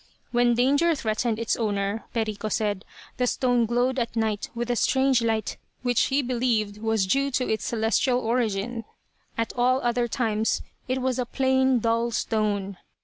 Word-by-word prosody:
When 240 0 +3
danger 285 +7 +3
threatened 220 -2 -1
its 230 -1 0
owner, 205 -1 -1
Perico 215 -2 -2
said, 205 -2 -1 0.3
the 250 - +1
stone 245 -2 +1
glowed 245 +3 +1
at 235 -1 -3
night 220 -2 -1
with 240 +1 -2
a - - +1
strange 265 +1 +2
light 220 -2 -1 0.3
which 245 -2 +2
he 275 +1 +1
believed 235 -4 0
was 220 -2 +1
due 275 +8 +1
to 255 -1 -1
its 220 - -1
celestial 235 +2 +1
origin. 230 -1 -1 0.5
At 230 0 -1
all 250 +1 +3
other 240 0 +1
times 225 -3 0 0.2
it 255 0 -1
was 260 -1 0
a 250 - 0
plain 260 0 +2
dull 230 +1 +1
stone. 205 -4 -1
235 Hz, 160 wpm, -25 LUFS, 220-250 Hz, 0.5 s, When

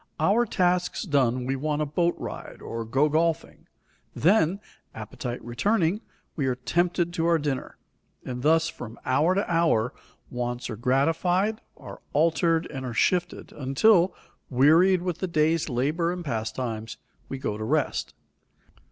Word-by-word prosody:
Our 205 +9 +3
tasks 180 0 0
done, 130 - +1
we 135 +1 -1
take 150 +2 -2
a 150 - +1
boat 170 +4 0
ride - - -7
or 115 0 -5
go 135 +7 +2
golfing; 160 +2 -1 0.5
then, 185 0 +3 0.4
appetite 115 +3 -6
returning, 180 - +1 0.3
we 140 -5 -1
are 130 - 0
tempted 170 +7 0
to 165 -1 0
our 170 -1 +4
dinner. 145 -4 -3 0.5
And 125 -1 -5
thus 160 +3 +3
from 120 -6 -8
hour 150 +8 +2
to 200 - 0
hour 165 -9 +2 0.4
wants 120 0 -3
are - - -4
gratified, 165 - +1 0.2
are - - -11
altered 165 +1 +2
and 135 -2 -5
are 125 -3 -5
shifted, 175 +6 0
until, 170 +7 +3 0.3
wearied 165 +8 +4
with 180 -2 -3
the 190 - -2
day's 160 -1 +1
labor 150 +7 0
and 180 -1 -5
pastimes, 115 -2 -4 0.3
we 135 - -4
go 120 -5 -3
to 110 - -5
rest. 110 - -1
155 Hz, 145 wpm, -26 LUFS, 125-175 Hz, 0.5 s, our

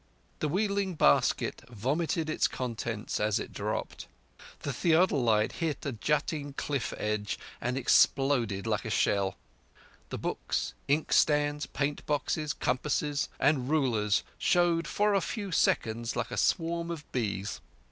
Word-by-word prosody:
_" - - -37
The 155 - 0
wheeling 200 +1 0
basket 70 - +3
vomited 150 +8 -1
its 155 - +2
contents 115 -3 -3
as 105 -1 +2
it - - -7
dropped. - - -4 0.5
The 140 - -3
theodolite 135 -10 +3
hit 160 -4 -3
a 140 - -1
jutting 145 +4 -1
cliff 140 -2 -2
ledge 105 -1 -2 0.2
and 125 +2 -1
exploded 125 -5 +3
like - - 0
a - - -4
shell; 100 -1 +1 0.7
the - - -4
books, - - -2
inkstands, 145 0 +2
paint 145 +1 -2
boxes, 150 +1 0
compasses, 145 +2 -1
and 135 -2 +2
rulers 115 -9 +2 0.2
showed 170 -2 +2
for 210 +8 +2
a 195 - +3
few 200 0 -4
seconds 115 -7 +1
like 125 -1 -2
a - - -3
swarm 170 -1 +1
of 160 -3 -5
bees. 100 -5 -2
140 Hz, 135 wpm, -29 LUFS, 115-160 Hz, 0.7 s, basket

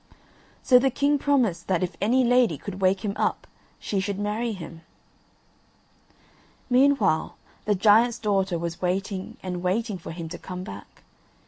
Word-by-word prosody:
So 250 -1 +6
the 270 +2 +2
king 285 +2 +1
promised 240 -13 +1
that 185 -1 +1
if 180 -1 -3
any 245 +6 +3
lady 245 - +3
could 195 +3 -8
wake 190 +3 +2
him 200 - -1
up - - -1 0.3
she 200 - -2
should 200 0 -2
marry 210 +3 -2
him. 170 -4 -9 1.9
Meanwhile 245 - +3 0.3
the 210 - +2
giant's 220 +4 +4
daughter 195 -4 0
was 170 +1 -5
waiting 190 +1 -3
and 180 -1 -4
waiting 195 +2 -1
for - - -9
him 165 0 -6
to 175 - -8
come 180 -1 -7
back. 205 - -11
200 Hz, 150 wpm, -25 LUFS, 180-235 Hz, 1.9 s, So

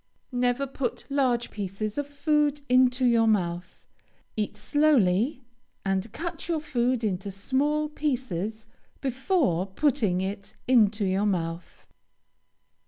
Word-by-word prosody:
Never 245 +2 +1
put 270 -1 -4
large 255 -4 +1
pieces 205 +1 -4
of 290 -1 -2
food 295 0 +1
into 255 0 +4
your 230 -2 +4
mouth. 180 -4 -1 0.5
Eat 210 -1 -2
slowly, 265 -4 +2 0.4
and 195 +2 -1
cut 335 +7 -5
your 335 -2 0
food 250 -4 0
into 200 -2 -1
small 280 +10 0
pieces 225 - -3 0.3
before 265 - 0
putting 210 -4 +1
it 200 +2 -5
into 220 -4 +4
your 195 +2 +1
mouth. 170 -3 -3
240 Hz, 110 wpm, -27 LUFS, 195-280 Hz, 0.5 s, into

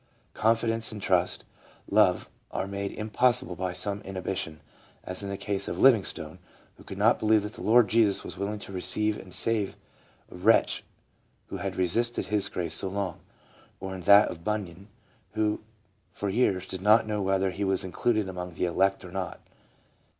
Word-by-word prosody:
Confidence 115 +1 +1
and 110 - -7
trust, 90 -2 +1 0.4
love, - - +3 0.2
are - - -3
made 100 0 -4
impossible 120 0 +2
by 90 +1 -2
some 100 +2 -2
inhibition, 95 -4 -4 0.4
as 90 +2 -3
in 100 - -5
the 100 - -4
case 100 -1 -2
of - - -3
Liv 135 0 +8
ingstone, 90 -6 -5 0.4
who - - -16
could 95 - -9
not 110 +4 +4
believe 110 -1 +3
that 105 +1 -6
the 120 - -10
Lord 115 0 +5
Jesus 110 -2 +2
was - - -7
will 100 +1 -3
ing 105 - -4
to 100 -1 -10
receive 105 +3 -1
and 95 - -12
save 110 0 0 0.6
a - - -10
wretch 100 +6 +3 0.7
who - - -5
had 95 -2 -4
resisted 115 +7 +1
His 105 -2 0
grace 85 -3 -3
so 95 - -1
long; 95 -2 -3 0.6
or 95 0 -5
in 95 - -6
that 100 +4 +7
of 85 - -8
Bunyan, 100 -3 -4 0.5
who 105 -1 0 0.5
for 100 - -4
years 95 -3 +1
did 95 0 -7
not 105 +3 +5
know 105 -1 -2
whether 95 0 +1
he 100 +3 -4
was 95 0 +1
included 110 +3 0
among 90 -2 -6
the - - 0
elect 95 +2 +1
or 90 - -10
not. 95 -1 -4
100 Hz, 180 wpm, -27 LUFS, 95-110 Hz, 0.7 s, Liv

